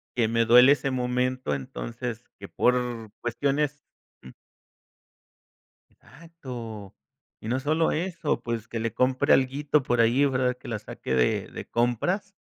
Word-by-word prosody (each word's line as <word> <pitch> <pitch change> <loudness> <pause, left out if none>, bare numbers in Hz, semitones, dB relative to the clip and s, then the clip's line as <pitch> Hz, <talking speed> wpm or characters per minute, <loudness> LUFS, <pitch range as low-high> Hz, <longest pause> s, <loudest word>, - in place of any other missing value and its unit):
que 115 -3 +2
me 115 +1 +1
duele 125 +3 +8
ese 140 -1 +1
momento, 125 - -1
entonces, 115 - -5 0.2
que - - -8
por 120 -3 0
cuestiones 140 +4 -1 0.4
mm. 65 - -11 1.6
Exacto. 125 - -10 0.5
Y 110 - -7
no 130 +3 0
sólo 155 +4 +1
eso, 165 -2 -2
pues 115 -1 -4
que 115 - -4
le 115 -1 -2
compre 130 0 +2
alguito 140 +3 +1
por 120 -2 0
ahí, 120 +5 +4
¿verdad?, 130 -2 +1
que - - -12
la 115 -2 -2
saque 65 - -5
de 60 -2 +1
de - - -8
compras, 175 - -1
125 Hz, 140 wpm, -26 LUFS, 115-140 Hz, 1.6 s, duele